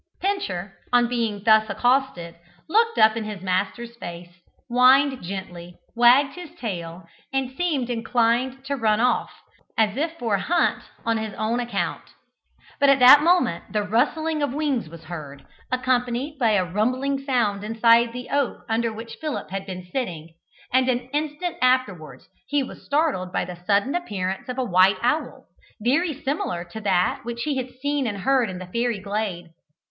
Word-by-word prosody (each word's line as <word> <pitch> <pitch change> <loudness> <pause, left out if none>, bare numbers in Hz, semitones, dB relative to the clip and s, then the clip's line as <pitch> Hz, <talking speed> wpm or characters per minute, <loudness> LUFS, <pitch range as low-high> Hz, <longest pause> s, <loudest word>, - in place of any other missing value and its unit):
Pincher, 380 - -2 0.2
on 245 -1 +4
being 230 -4 -2
thus 220 -1 +5
accosted, 245 -6 0 0.3
looked 455 +6 +2
up 220 0 +5
in 230 - -3
his 210 -3 -7
master's 200 +6 -2
face, 175 -4 -8 0.4
whined 260 +2 +4
gently, 175 -2 -7 0.2
wagged 250 +4 +5
his 345 -2 -10
tail, 175 - -6 0.3
and 265 -1 -1
seemed 305 -8 -1
inclined 245 +2 0
to 280 +1 -2
run 220 -4 +1
off, 250 +2 +1 0.5
as 215 -1 +2
if 325 +3 -2
for 230 -6 -2
a 200 - +2
hunt 350 +2 +1 0.2
on 230 0 +1
his 220 -2 -5
own 220 +3 -1
account. 235 -5 -2 0.8
But 280 -1 +5
at 275 - +6
that 260 +3 +9
moment 340 - +2
the 210 -1 +1
rustling 305 +9 0
of 285 -2 -1
wings 285 - -1
was 165 0 -12
heard, 145 -5 -9 0.3
accompanied 255 +3 -1
by 230 -4 +3
a 190 -3 +2
rumbling 255 +9 0
sound 225 -7 0
inside 230 +2 +4
the 250 +1 -8
oak 285 -2 -1
under 230 +1 0
which 225 +1 -9
Philip 305 -10 -4
had 195 +1 -4
been 185 -1 -7
sitting, 170 -11 -4 0.4
and 260 0 +3
an 250 0 -1
instant 310 +4 -2
afterwards 250 -11 0 0.2
he 285 +1 +1
was - - -10
startled 285 - 0
by - - -1
the 175 -1 -10
sudden 205 +6 +2
appearance 195 - -3
of 250 - -4
a 260 - 0
white 190 -2 +4
owl, 300 +6 -1 0.3
very 285 +6 0
similar 265 - -2
to 220 - -7
that 185 -3 +1
which 235 -1 -5
he 290 -3 -1
had 255 -1 -3
seen 285 0 -1
and 200 -3 -4
heard 260 -1 +2
in 185 - -6
the 185 - -7
fairy 235 +4 -1
glade. 195 -4 -4
235 Hz, 170 wpm, -23 LUFS, 200-270 Hz, 0.8 s, that